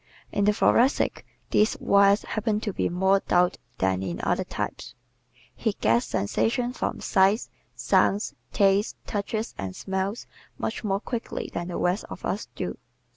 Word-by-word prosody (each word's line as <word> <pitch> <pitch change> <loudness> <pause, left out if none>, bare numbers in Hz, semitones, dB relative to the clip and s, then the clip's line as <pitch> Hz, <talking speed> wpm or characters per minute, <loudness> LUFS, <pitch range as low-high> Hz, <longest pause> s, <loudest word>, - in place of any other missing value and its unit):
In 200 - +1
the 210 - +5
Thoracic 240 +5 +2 0.2
these 215 +2 +3
wires 200 +1 +4
happen 215 -1 -1
to 210 -3 -3
be - - 0
more 190 +2 +3
taut 180 -1 +2 0.2
than 95 0 +1
in 90 -3 -3
the - - -4
other - - +1
types. - - -5 0.6
He 220 -3 -1
gets 115 - +2
sensations 240 - 0
from - - -2
sights, 195 +4 +2 0.2
sounds, 205 +2 +2 0.2
tastes, 200 +1 +3
touches 215 +1 -3
and 95 -1 -4
smells 190 +3 -3 0.3
much 220 - -3
more 200 -1 0
quickly 235 -1 -4
than 170 0 -3
the 180 - -4
rest 180 +4 0
of - - -7
us - - -2
do. - - -4
200 Hz, 155 wpm, -26 LUFS, 180-215 Hz, 0.6 s, the